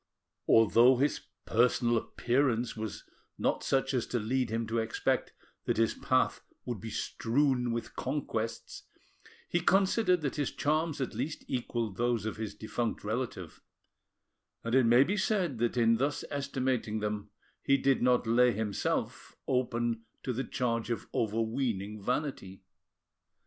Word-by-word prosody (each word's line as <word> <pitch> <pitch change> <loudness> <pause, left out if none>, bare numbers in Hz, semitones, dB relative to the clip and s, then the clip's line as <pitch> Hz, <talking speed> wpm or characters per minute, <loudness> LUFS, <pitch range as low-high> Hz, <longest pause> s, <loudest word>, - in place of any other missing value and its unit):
Although 115 +3 +6
his 145 +3 +1 0.2
personal 120 +1 +3
appearance 120 0 0
was 110 -2 -5 0.3
not - - 0
such 135 0 +1
as 125 -3 0
to 125 - -1
lead 120 +2 0
him 115 +1 -1
to 115 +1 -1
expect 110 0 -1 0.3
that - - 0
his 115 0 +2
path 130 0 +1 0.2
would 120 -6 -4
be 115 - -6
strewn 125 +2 0
with 115 0 -4
conquests, 125 -5 -3 0.7
he 175 - +1
considered 190 0 +3
that 145 0 -2
his 145 -3 0
charms 155 0 0
at 130 - -2
least 155 +1 -4
equalled 120 -5 -2
those 120 -3 0
of 110 - -3
his 110 -2 -5
defunct 110 +2 -3
relative; 110 -5 -4 1.0
and 115 - -3
it 130 -2 +5
may 120 +3 +7
be 195 +8 -1
said 185 - 0
that 120 +1 0
in 115 -1 +4
thus 140 +4 -1
estimating 130 -5 -1
them 105 -1 -3 0.3
he 140 - +3
did 135 0 +2
not 125 0 +3
lay 120 +2 +4
himself—open 115 +3 -2 0.2
to 125 - -2
the 130 +3 -2
charge 115 -3 -2
of 115 - -2
overweening 110 -2 -1
vanity. 125 -6 -3
120 Hz, 140 wpm, -30 LUFS, 115-135 Hz, 1.0 s, may